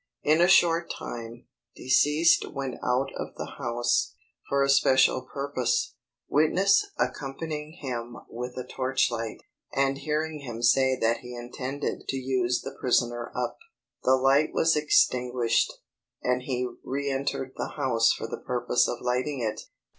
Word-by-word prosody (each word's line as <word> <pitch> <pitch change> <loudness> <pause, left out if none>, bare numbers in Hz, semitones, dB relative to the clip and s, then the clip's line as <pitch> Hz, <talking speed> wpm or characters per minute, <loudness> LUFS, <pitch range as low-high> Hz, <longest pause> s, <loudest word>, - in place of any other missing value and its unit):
In 155 +3 +4
a 175 - +6
short 170 -2 +4
time, 115 0 -7 0.3
deceased 150 +5 +3
went 135 -3 -4
out 130 +2 +1
of - - -6
the - - -7
house, 120 -2 0 0.3
for 140 0 +2
a - - +2
special 130 -1 +4
purpose, 270 - -1 0.3
witness 190 +6 +3
accompanying 150 +2 -3
him 120 -7 -5
with 125 +2 -6
a 125 - -4
torchlight, 125 -4 -1 0.3
and 135 0 +1
hearing 155 +1 -2
him 120 -4 -7
say 130 +2 +4
that 115 +1 +2
he 125 0 -9
intended 130 +4 -5
"to 135 - -1
use 125 -2 0
the 135 0 -7
prisoner 120 -1 0
up." 125 -1 -3 0.4
The 130 - +4
light 135 +3 +3
was 160 0 +3
extinguished, 125 -5 +2 0.5
and 125 0 +1
he 125 -1 -2 0.2
reëntered 135 -1 -2
the - - -4
house 115 -5 +3
for - - -3
the 115 - -6
purpose 125 0 +1
of 120 - -4
lighting 125 +3 -1
it. 110 -2 -2
130 Hz, 140 wpm, -27 LUFS, 120-145 Hz, 0.5 s, a